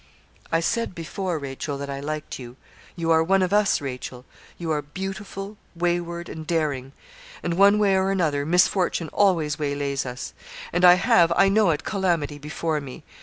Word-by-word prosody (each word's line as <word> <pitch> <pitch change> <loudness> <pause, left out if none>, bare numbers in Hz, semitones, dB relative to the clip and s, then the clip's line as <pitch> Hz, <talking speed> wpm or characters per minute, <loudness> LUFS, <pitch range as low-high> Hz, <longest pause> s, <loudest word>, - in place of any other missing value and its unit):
'I 165 - +2
said 230 +2 -1
before, 175 +1 -3
Rachel, 140 0 -5
that 140 0 -5
I 140 0 -4
liked 150 +1 -5
you. 120 -1 -9 0.4
You 165 -1 -1
are 160 0 +5
one 190 +3 +3
of 185 +2 -1
us, 205 -1 +3
Rachel. 125 -2 -6 0.3
You 165 -2 -3
are 150 -1 0
beautiful, 195 +5 -6 0.2
wayward, 170 0 -1
and 160 -1 -8
daring, 145 -5 -1 0.5
and 170 - -1
one 200 +3 +5
way 200 -2 +3
or 190 0 +2
another, 160 -7 +1
misfortune 175 0 +2
always 165 -7 +2
waylays 140 -2 -1
us; 125 +1 -6 0.4
and 175 +1 +1
I 180 0 +9
have, 175 -2 +4
I 195 - +5
know 210 -1 +4
it, 150 -2 0
calamity 170 -7 -1
before 150 +1 -2
me. 135 -2 -9
165 Hz, 170 wpm, -24 LUFS, 145-190 Hz, 0.5 s, I